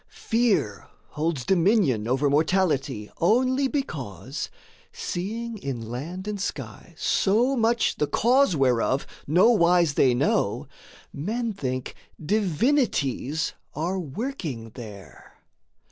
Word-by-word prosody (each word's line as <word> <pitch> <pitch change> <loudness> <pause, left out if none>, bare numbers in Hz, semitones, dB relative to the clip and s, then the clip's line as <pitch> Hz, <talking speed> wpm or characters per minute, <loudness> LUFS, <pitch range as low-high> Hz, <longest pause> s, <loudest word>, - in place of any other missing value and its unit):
Fear 220 - +1 0.2
holds 150 -4 -2
dominion 175 - +2
over 130 +4 +2
mortality 145 - +1
Only 255 +8 +3
because, 135 - -4 0.4
seeing 230 - -4
in 120 -7 -5
land 170 +10 -5
and 205 -2 -3
sky - - -6
So 235 +7 +2
much 230 -1 +1
the 150 - +1
cause 250 - +3
whereof 130 -1 +2 0.2
no 180 +10 +5
wise 175 -6 +4
they 130 -3 +4
know, - - 0 0.5
Men 220 +9 -2
think 130 -8 -4 0.3
Divinities 170 - 0 0.2
are 175 +5 -1
working 155 - -5
there. 100 - -11
170 Hz, 100 wpm, -25 LUFS, 135-225 Hz, 0.5 s, no